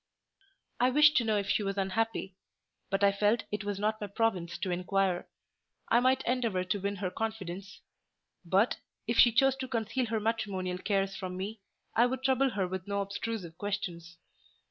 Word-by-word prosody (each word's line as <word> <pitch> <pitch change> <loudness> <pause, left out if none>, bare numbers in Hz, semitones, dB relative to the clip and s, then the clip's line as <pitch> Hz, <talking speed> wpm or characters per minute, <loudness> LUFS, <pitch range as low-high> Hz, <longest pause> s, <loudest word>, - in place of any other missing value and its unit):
I 250 - +4
wished 300 +3 +6
to 245 - +4
know 220 -2 +1
if 200 -1 -1
she 210 - +2
was 195 0 -2
unhappy; 195 0 -1 0.6
but 195 +1 0
I 200 - +6
felt 210 +3 +2
it 210 +1 -2
was 205 -1 -2
not 215 +2 -1
my 205 - -3
province 185 -5 -1
to 180 +1 -2
inquire: 185 0 0 0.6
I 235 - +5
might 255 +1 +3
endeavour 235 -7 0
to 185 +2 -2
win 200 +1 -1
her 185 -2 -3
confidence; 195 -4 -5 0.6
but, 190 +6 +2 0.3
if 235 +1 0
she 240 - +8
chose 265 +3 +4
to 260 -1 -4
conceal 230 0 -1
her 220 0 0
matrimonial 200 -5 -2
cares 195 0 0
from 185 -3 -5
me, 205 +4 -5 0.4
I 240 +2 +5
would 260 +1 -4
trouble 265 0 +3
her 200 -6 -1
with 185 +1 -5
no 200 0 0
obtrusive 200 -3 -4
questions. 175 -4 -4
205 Hz, 180 wpm, -30 LUFS, 190-230 Hz, 0.6 s, she